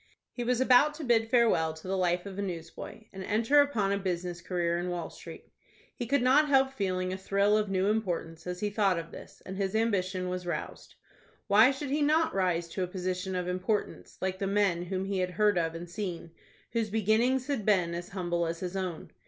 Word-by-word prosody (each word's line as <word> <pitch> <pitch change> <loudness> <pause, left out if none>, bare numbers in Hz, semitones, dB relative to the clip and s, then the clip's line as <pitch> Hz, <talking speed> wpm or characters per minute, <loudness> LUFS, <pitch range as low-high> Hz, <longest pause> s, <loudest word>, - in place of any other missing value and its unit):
He 245 - -4
was 245 0 +1
about 260 +4 +5
to 310 - -7
bid 225 -3 +2
farewell 220 -10 +3
to 160 +3 -11
the 190 - 0
life 180 -1 +1
of 200 0 -7
a - - 0
newsboy, 175 +2 -6
and 190 0 -6
enter 230 +9 +4
upon 225 -9 +1
a 200 - 0
business 175 -2 -3
career 170 -1 -1
in 180 +1 -3
Wall 175 -1 -4
Street. - - -12 0.4
He 240 - -4
could 280 0 +2
not 280 +4 +5
help 270 -1 +4
feeling 185 -4 -1
a - - -3
thrill 200 +2 +2
of 210 -1 +1
new 190 0 +1
importance 180 -6 -2
as 180 0 -4
he 210 -1 -1
thought 200 -4 +2
of 165 0 -6
this, - - -12
and 190 0 -6
his 195 +1 -1
ambition 185 -5 0
was 180 0 -4
roused. 175 - -5 0.5
Why 215 +4 +6
should 270 0 -4
he 295 +1 +1
not 315 +2 +3
rise 180 -3 0
to 190 - -4
a - - -2
position 185 0 -3
of 180 -1 -2
importance 185 +4 -2
like 190 0 -2
the 195 - -1
men 195 -4 +1
whom 190 +1 -3
he 195 -1 -2
had 180 0 0
heard 205 +1 +2
of 165 -1 -1
and 170 +1 -6
seen, 175 -3 -5 0.4
whose 230 -2 -1
beginnings 225 +5 +2
had 275 -6 -2
been 185 -5 +2
as 175 +1 -5
humble 175 -2 -1
as 165 0 -4
his 180 +1 -5
own? 185 -4 -4
190 Hz, 220 wpm, -29 LUFS, 180-220 Hz, 0.5 s, Why